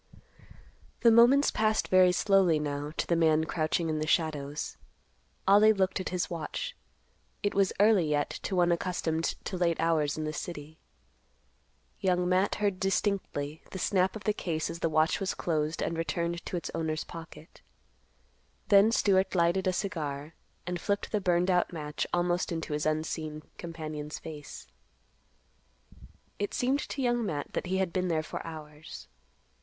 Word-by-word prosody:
The 230 Hz, -, +6 dB
moments 245 Hz, +5 st, +6 dB
passed 215 Hz, 0 st, +1 dB
very 185 Hz, -1 st, +6 dB
slowly 185 Hz, -3 st, +3 dB
now 145 Hz, 0 st, -3 dB
to -, -, 0 dB
the 170 Hz, -, +1 dB
man 160 Hz, -1 st, +3 dB
crouching 160 Hz, +1 st, -1 dB
in 155 Hz, -1 st, -1 dB
the 155 Hz, -, -2 dB
shadows. 150 Hz, -3 st, -1 dB, 0.7 s
Ollie 210 Hz, +2 st, +7 dB
looked 195 Hz, -1 st, 0 dB
at 185 Hz, -, -3 dB
his 180 Hz, -2 st, -1 dB
watch. 175 Hz, -, -5 dB, 0.7 s
It 205 Hz, -, +1 dB
was 195 Hz, -1 st, +2 dB
early 205 Hz, -6 st, +4 dB
yet 145 Hz, -1 st, 0 dB
to 195 Hz, -, -3 dB
one 175 Hz, -1 st, +3 dB
accustomed 165 Hz, -2 st, -1 dB, 0.2 s
to 185 Hz, -, -3 dB
late 170 Hz, -2 st, +1 dB
hours 155 Hz, -3 st, +1 dB
in 155 Hz, -, -2 dB
the 155 Hz, 0 st, -3 dB
city. 155 Hz, -1 st, -7 dB, 1.2 s
Young 180 Hz, -2 st, +1 dB
Matt 185 Hz, +2 st, +2 dB
heard 200 Hz, -3 st, -1 dB
distinctly 190 Hz, -6 st, -1 dB
the -, -, -6 dB
snap 190 Hz, +1 st, +1 dB
of 215 Hz, -, -7 dB
the 210 Hz, -, +1 dB
case 160 Hz, -6 st, -2 dB
as 170 Hz, -, -7 dB
the 165 Hz, -, 0 dB
watch 155 Hz, +1 st, +2 dB
was 195 Hz, -2 st, -2 dB
closed 155 Hz, -1 st, -1 dB
and 165 Hz, -, -2 dB
returned 170 Hz, +1 st, -2 dB
to 180 Hz, -, -2 dB
its 170 Hz, -, -5 dB
owner's 160 Hz, -1 st, -2 dB
pocket. 165 Hz, -1 st, -11 dB, 1.1 s
Then 205 Hz, +2 st, +6 dB
Stewart 190 Hz, -4 st, +2 dB
lighted 175 Hz, +2 st, +2 dB
a -, -, +4 dB
cigar, 160 Hz, -6 st, -4 dB, 0.3 s
and 175 Hz, -1 st, -3 dB
flipped 200 Hz, 0 st, -1 dB
the 210 Hz, -, 0 dB
burned 180 Hz, 0 st, +2 dB
out 180 Hz, -1 st, +2 dB
match 150 Hz, -3 st, -4 dB
almost 175 Hz, 0 st, 0 dB
into 160 Hz, -2 st, -3 dB
his 150 Hz, +1 st, -1 dB
unseen 155 Hz, 0 st, -2 dB, 0.2 s
companion's 155 Hz, -3 st, -6 dB
face. 150 Hz, -2 st, -9 dB, 1.7 s
It 205 Hz, -, -2 dB
seemed 260 Hz, +3 st, +1 dB
to 275 Hz, -, -3 dB
Young 240 Hz, -1 st, +1 dB
Matt 150 Hz, -8 st, -4 dB
that -, -, -2 dB
he 190 Hz, +1 st, 0 dB
had 190 Hz, -3 st, -1 dB
been 185 Hz, 0 st, 0 dB
there 160 Hz, -2 st, 0 dB
for -, -, -6 dB
hours. 150 Hz, -, -9 dB
170 Hz, 160 wpm, -29 LUFS, 155-190 Hz, 1.7 s, Ollie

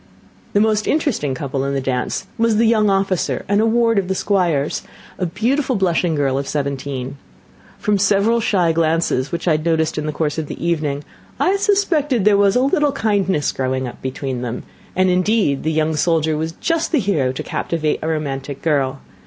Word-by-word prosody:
The 205 Hz, -, +4 dB
most 215 Hz, 0 st, +2 dB
interesting 235 Hz, -, 0 dB
couple 135 Hz, 0 st, -3 dB
in 140 Hz, 0 st, -1 dB
the -, -, +1 dB
dance 130 Hz, +6 st, -2 dB
was 230 Hz, -2 st, +2 dB
the 230 Hz, -, +4 dB
young 215 Hz, -2 st, +3 dB
officer 195 Hz, -2 st, 0 dB
and 205 Hz, +1 st, +2 dB
a 225 Hz, -, +3 dB
ward 230 Hz, -1 st, +3 dB
of 190 Hz, -, -3 dB
the 190 Hz, -, -1 dB
Squire's, 175 Hz, -9 st, 0 dB, 0.4 s
a 180 Hz, -, 0 dB
beautiful 250 Hz, -, 0 dB
blushing 175 Hz, -4 st, +1 dB
girl 135 Hz, -2 st, +1 dB
of 140 Hz, -, -4 dB
seventeen. 140 Hz, -2 st, -3 dB, 0.6 s
From 210 Hz, -1 st, 0 dB
several 205 Hz, +4 st, +3 dB
shy 185 Hz, -6 st, +2 dB
glances 160 Hz, -4 st, +1 dB
which 170 Hz, -, -4 dB
I -, -, +4 dB
had 155 Hz, 0 st, +1 dB
noticed 160 Hz, -2 st, +1 dB
in 150 Hz, -, -3 dB
the -, -, -1 dB
course 150 Hz, 0 st, -2 dB
of 155 Hz, -, -4 dB
the -, -, -7 dB
evening, 150 Hz, -4 st, -1 dB, 0.4 s
I 380 Hz, -, +3 dB
suspected 320 Hz, -, +1 dB
there 210 Hz, -1 st, +5 dB
was 200 Hz, 0 st, +3 dB
a 250 Hz, -, +3 dB
little 285 Hz, +1 st, +2 dB
kindness 195 Hz, -, +1 dB
growing 130 Hz, 0 st, -2 dB
up 120 Hz, -, -10 dB
between 130 Hz, -1 st, -4 dB
them; 125 Hz, -1 st, -4 dB, 0.3 s
and, 185 Hz, 0 st, +3 dB
indeed, 185 Hz, -5 st, +2 dB
the 160 Hz, -, -1 dB
young 155 Hz, 0 st, +1 dB
soldier 160 Hz, 0 st, +1 dB
was 160 Hz, +1 st, -3 dB
just 330 Hz, -, -1 dB
the 325 Hz, -, +3 dB
hero 165 Hz, -, +1 dB
to 130 Hz, -, -5 dB
captivate 155 Hz, -2 st, -2 dB
a 160 Hz, -, -3 dB
romantic 140 Hz, -3 st, -3 dB
girl. 140 Hz, -4 st, 0 dB
170 Hz, 195 wpm, -19 LUFS, 145-210 Hz, 0.6 s, there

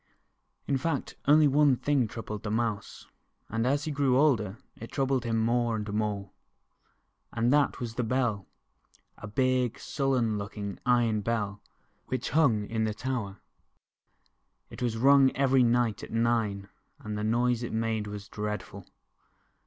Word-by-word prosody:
In 135 Hz, -2 st, 0 dB
fact, 160 Hz, -1 st, -2 dB
only 150 Hz, +1 st, +6 dB
one 145 Hz, -1 st, +4 dB
thing 135 Hz, -2 st, +1 dB
troubled 105 Hz, -1 st, -6 dB
the 110 Hz, -, -4 dB
Mouse, 110 Hz, -1 st, -2 dB, 0.4 s
and 115 Hz, +2 st, -1 dB
as 140 Hz, +2 st, +1 dB
he 155 Hz, -, -3 dB
grew 140 Hz, -3 st, +2 dB
older, 115 Hz, -9 st, +2 dB, 0.2 s
it 115 Hz, -, -10 dB
troubled 135 Hz, -2 st, 0 dB
him 115 Hz, -1 st, 0 dB
more 120 Hz, +1 st, +1 dB
and 105 Hz, -1 st, -4 dB
more. 105 Hz, -2 st, -2 dB, 1.0 s
And 120 Hz, +3 st, +1 dB
that 145 Hz, -1 st, +2 dB
was 120 Hz, -2 st, -4 dB
the 125 Hz, -, -2 dB
Bell, 115 Hz, -5 st, -1 dB, 0.7 s
a 105 Hz, -, -7 dB
big, 125 Hz, +2 st, +1 dB
sullen 125 Hz, -7 st, 0 dB
looking 100 Hz, -1 st, -6 dB
iron 120 Hz, -3 st, +3 dB
Bell, 105 Hz, -2 st, -2 dB, 0.5 s
which 130 Hz, -1 st, -3 dB
hung 125 Hz, -9 st, +3 dB
in 110 Hz, +1 st, -2 dB
the 105 Hz, -1 st, -2 dB
tower. 115 Hz, -6 st, -4 dB, 1.3 s
It -, -, -10 dB
was 120 Hz, -2 st, -1 dB
rung 135 Hz, +2 st, +5 dB
every 135 Hz, -1 st, +3 dB
night 120 Hz, -3 st, +2 dB
at -, -, -8 dB
nine, 115 Hz, -4 st, 0 dB, 0.3 s
and 105 Hz, 0 st, -6 dB
the 105 Hz, -, -3 dB
noise 120 Hz, +2 st, +1 dB
it 120 Hz, -, -4 dB
made 110 Hz, -1 st, -1 dB
was 105 Hz, 0 st, -7 dB
dread 105 Hz, 0 st, -4 dB
ful. -, -, -12 dB
115 Hz, 155 wpm, -28 LUFS, 105-130 Hz, 1.3 s, only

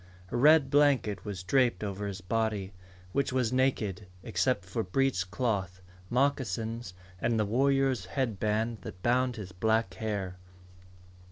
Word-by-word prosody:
A -, -, -3 dB
red 145 Hz, +2 st, +5 dB
blanket 135 Hz, -10 st, +3 dB
was 100 Hz, -3 st, -5 dB
draped 125 Hz, +3 st, +2 dB
over 100 Hz, 0 st, -3 dB
his 100 Hz, 0 st, -5 dB
body, 105 Hz, -1 st, -1 dB, 0.4 s
which 140 Hz, +6 st, 0 dB
was 125 Hz, -2 st, 0 dB
naked 110 Hz, -7 st, 0 dB, 0.2 s
except -, -, 0 dB
for -, -, -2 dB
breech 95 Hz, -2 st, 0 dB
cloth, 100 Hz, -4 st, -1 dB, 0.3 s
moccasins, 120 Hz, -5 st, -1 dB, 0.3 s
and 115 Hz, -2 st, +1 dB
the 105 Hz, -, +2 dB
warrior's 135 Hz, 0 st, +2 dB
headband 110 Hz, +1 st, -1 dB
that 90 Hz, -, -9 dB
bound 125 Hz, +1 st, +2 dB
his 100 Hz, -4 st, -7 dB
black 110 Hz, +1 st, +1 dB
hair. 95 Hz, -2 st, -3 dB
110 Hz, 135 wpm, -30 LUFS, 95-130 Hz, 0.4 s, red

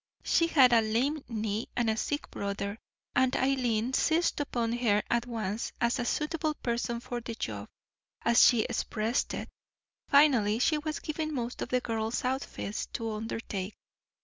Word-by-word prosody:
She 335 Hz, -, +3 dB
had 265 Hz, -7 st, +6 dB
a 230 Hz, -, +6 dB
lame 255 Hz, +7 st, 0 dB
knee 220 Hz, -1 st, -2 dB
and 240 Hz, -2 st, +1 dB
a 220 Hz, -, +2 dB
sick 290 Hz, +6 st, -3 dB
brother, 200 Hz, +1 st, -3 dB, 0.4 s
and 255 Hz, 0 st, +3 dB
Eileen 250 Hz, -3 st, +1 dB
seized 330 Hz, +4 st, +2 dB
upon 235 Hz, -5 st, -1 dB
her 225 Hz, -4 st, +2 dB
at 235 Hz, +1 st, +1 dB
once 220 Hz, -2 st, -3 dB
as 235 Hz, +1 st, +1 dB
a 240 Hz, -, -1 dB
suitable 305 Hz, +3 st, -1 dB
person 235 Hz, -1 st, -2 dB
for 240 Hz, 0 st, -5 dB
the 230 Hz, 0 st, -6 dB
job, -, -, -5 dB, 0.5 s
as 235 Hz, 0 st, +6 dB
she 240 Hz, -3 st, +6 dB
expressed 225 Hz, +3 st, -1 dB
it. -, -, -5 dB, 0.6 s
Finally, 255 Hz, -8 st, +5 dB
she 300 Hz, +5 st, +2 dB
was 305 Hz, +1 st, -3 dB
given 310 Hz, -1 st, -3 dB
most 240 Hz, -1 st, -4 dB
of -, -, -3 dB
the 250 Hz, 0 st, +1 dB
girls' 225 Hz, 0 st, -2 dB
outfits 255 Hz, -5 st, -3 dB
to 225 Hz, -1 st, -4 dB
undertake. 215 Hz, -2 st, -4 dB
235 Hz, 160 wpm, -30 LUFS, 220-270 Hz, 0.6 s, had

